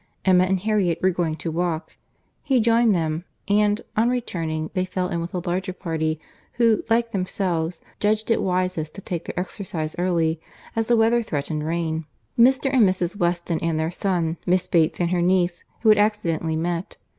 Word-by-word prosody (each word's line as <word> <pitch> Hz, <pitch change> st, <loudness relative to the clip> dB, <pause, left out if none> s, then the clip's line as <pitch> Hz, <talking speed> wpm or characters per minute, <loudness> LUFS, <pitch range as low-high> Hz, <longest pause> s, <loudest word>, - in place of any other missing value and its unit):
Emma 185 Hz, -1 st, +5 dB
and 190 Hz, 0 st, 0 dB
Harriet 200 Hz, -5 st, +1 dB
were 190 Hz, -, +4 dB
going 170 Hz, -3 st, -1 dB
to 160 Hz, +1 st, -4 dB
walk; 170 Hz, -1 st, -2 dB, 0.5 s
he 270 Hz, -4 st, +2 dB
joined 230 Hz, -1 st, +4 dB
them; 160 Hz, -1 st, -1 dB, 0.2 s
and, 210 Hz, +1 st, +3 dB
on 225 Hz, +3 st, +3 dB
returning, 165 Hz, -10 st, -2 dB
they 185 Hz, -2 st, +1 dB
fell 185 Hz, 0 st, -2 dB
in 170 Hz, -, -2 dB
with 170 Hz, -, -5 dB
a 175 Hz, -1 st, -4 dB
larger 185 Hz, +2 st, -1 dB
party, 160 Hz, -4 st, -2 dB, 0.3 s
who, 230 Hz, -2 st, +3 dB
like 230 Hz, +1 st, +2 dB
themselves, 180 Hz, -4 st, -2 dB, 0.2 s
judged 215 Hz, +2 st, +1 dB
it -, -, +3 dB
wisest 180 Hz, -4 st, -1 dB
to 195 Hz, -, -8 dB
take 175 Hz, -3 st, -4 dB
their -, -, -4 dB
exercise 175 Hz, -4 st, -4 dB
early, 165 Hz, -3 st, +1 dB, 0.3 s
as 225 Hz, -1 st, 0 dB
the 240 Hz, -, +4 dB
weather 230 Hz, +2 st, +4 dB
threatened 150 Hz, -5 st, -3 dB
rain; 160 Hz, 0 st, -2 dB, 0.3 s
Mr. 265 Hz, +3 st, +4 dB
and 260 Hz, -, +5 dB
Mrs. 185 Hz, 0 st, -1 dB
Weston 175 Hz, -3 st, 0 dB
and 165 Hz, -1 st, 0 dB
their 160 Hz, +1 st, -1 dB
son, 175 Hz, -3 st, -1 dB
Miss 185 Hz, 0 st, +2 dB
Bates 165 Hz, -3 st, +2 dB
and 175 Hz, -1 st, +1 dB
her 180 Hz, -1 st, +1 dB
niece, 175 Hz, -1 st, +1 dB, 0.2 s
who 220 Hz, -, +4 dB
had 215 Hz, -1 st, +6 dB
accidentally 170 Hz, -7 st, +1 dB
met. 170 Hz, +2 st, -3 dB
180 Hz, 180 wpm, -23 LUFS, 165-210 Hz, 0.5 s, had